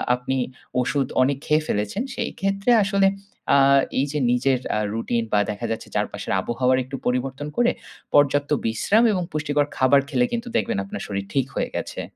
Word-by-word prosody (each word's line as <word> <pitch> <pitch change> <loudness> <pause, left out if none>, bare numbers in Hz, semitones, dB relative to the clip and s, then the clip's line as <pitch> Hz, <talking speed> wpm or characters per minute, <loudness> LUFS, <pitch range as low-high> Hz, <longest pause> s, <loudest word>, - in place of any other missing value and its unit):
আপনি 125 +2 -3 0.4
ওষুধ 135 +1 0
অনেক 135 +1 +2
খেয়ে 155 +1 +2
ফেলেছেন 105 - -1
সেই - - -2
ক্ষেত্রে 195 +4 +1
আসলে 195 -1 +3 0.5
আ - - +6 0.4
এই 135 - +2
যে 150 - -1
নিজের 125 +1 +2 0.2
আ - - +1
রুটিন 115 +1 -1
বা 105 - +5
দেখা 105 +3 -5
যাচ্ছে 110 - -4
চারপাশের - - -2
আবহাওয়ার 125 +2 +1
একটু 130 +2 -7
পরিবর্তন 130 +3 -2
করে 240 +1 +4 0.4
পর্যাপ্ত 145 0 +3 0.2
বিশ্রাম 155 - +2
এবং 180 -2 -1
পুষ্টিকর 145 -1 0
খাবার 135 +2 +5
খেলে 125 -4 +2
কিন্তু 235 +1 -3
দেখবেন - - -1
আপনার 100 - -6
শরীর 100 -1 -3
ঠিক 135 -2 +2
হয়ে - - -1
গেছে। - - -4
135 Hz, 175 wpm, -23 LUFS, 125-150 Hz, 0.5 s, আ